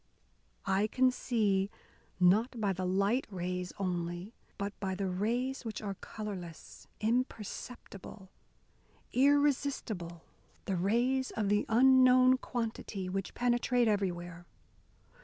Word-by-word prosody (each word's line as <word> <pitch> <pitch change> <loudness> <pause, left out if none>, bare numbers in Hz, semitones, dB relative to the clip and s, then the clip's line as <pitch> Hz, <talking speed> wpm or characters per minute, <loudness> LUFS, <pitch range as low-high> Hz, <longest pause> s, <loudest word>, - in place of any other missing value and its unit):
I 195 +2 +2
can 255 +3 +3
see, 205 -6 0 0.5
not 215 +7 +3
by 200 -3 +1
the 185 0 -3
light 200 +7 +1
rays 180 -1 -3
only, 175 +1 -3 0.2
but 200 0 -3
by 190 -1 -2
the 195 +1 -2
rays 235 +9 -1
which 225 -2 -5
are 200 -2 -4
colourless, 190 -5 -8
imperceptible, 215 -4 -4 0.8
irresistible 265 - +1 0.4
the 195 - -1
rays 240 +8 +1
of 210 -3 -2
the 205 0 +2
unknown 255 +1 +6
quantity, 220 -6 -4
which 195 0 -4
penetrate 245 0 +2
everywhere. 175 -4 -2
210 Hz, 105 wpm, -32 LUFS, 185-245 Hz, 0.8 s, unknown